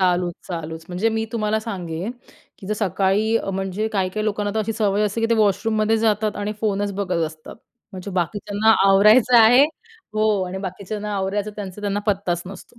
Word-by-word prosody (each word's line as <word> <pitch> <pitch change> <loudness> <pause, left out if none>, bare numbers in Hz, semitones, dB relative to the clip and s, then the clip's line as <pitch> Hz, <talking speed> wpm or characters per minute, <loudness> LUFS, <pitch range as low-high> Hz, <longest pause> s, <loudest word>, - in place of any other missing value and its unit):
चालूच, 180 -1 +1
चालूच 165 -2 -6
म्हणजे 185 +5 0
मी 220 0 -1
तुम्हाला 215 -1 0
सांगेल, 185 -2 -5 0.5
की 190 - -11
जर 215 - -1
सकाळी 205 +2 +1
अ, 195 - -2
म्हणजे 195 +2 -2
काही-काही 200 +1 -1
लोकांना 205 -1 -1
तर - - 0
अशी 225 +1 -2
सवय 210 -2 +1
असते, 210 +2 -1
की 225 - +2
ते - - +5
वॉशरूममध्ये 215 +1 +2
जातात 215 -1 +1
आणि 205 +1 -3
फोनच 205 -2 0
बघत 185 -4 -1
असतात. 155 0 -11 0.4
म्हणजे 185 +1 -7
बाकीच्यांना 205 +4 0 0.2
आवरायचं 215 +5 +6
आहे 245 +5 +7
हो. 220 - -2
आणि 185 +1 -5
बाकीच्यांना 205 +2 -5
आवरायचं 200 +2 -2
त्यांचं 200 -1 -7
त्यांना 205 0 -1
पत्ताच 185 -4 0
नसतो 195 +5 -12
205 Hz, 175 wpm, -22 LUFS, 190-215 Hz, 0.5 s, आहे